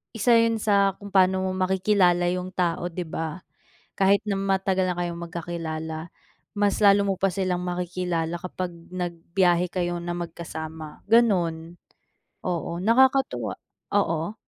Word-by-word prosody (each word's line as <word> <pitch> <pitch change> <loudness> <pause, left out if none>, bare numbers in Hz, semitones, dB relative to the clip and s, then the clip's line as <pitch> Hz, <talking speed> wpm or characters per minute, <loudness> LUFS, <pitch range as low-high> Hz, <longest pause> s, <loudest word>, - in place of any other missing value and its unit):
1 230 +3 +2
yun 230 0 +3
sa 200 -2 +2
kung 200 -1 -10
paano 190 0 +4
mo 185 - -1
makikilala 185 -1 +2
yung 180 0 -3
tao, 175 -1 0
'di 175 +1 -4
ba? 160 +2 -5 0.6
Kahit 200 +1 +4
na 200 - 0
matagal 190 -1 +1
na 180 - -1
kayong 175 -1 -3
magkakilala, 160 -1 -5 0.5
mas 205 0 +1
lalo 200 0 +6
mo 195 - +1
pa 195 - +3
silang 185 -1 -1
makikilala 175 -1 -2
kapag 180 0 -4 0.2
nagbiyahe 175 0 0
kayo 175 -1 -1
na 175 0 -4
magkasama, 160 -2 -7
ganun, 175 -8 +2 0.7
oo. 170 -1 -2
Nakakatuwa, 265 +4 +3 0.4
oo. 170 -1 0
180 Hz, 135 wpm, -25 LUFS, 170-195 Hz, 0.7 s, lalo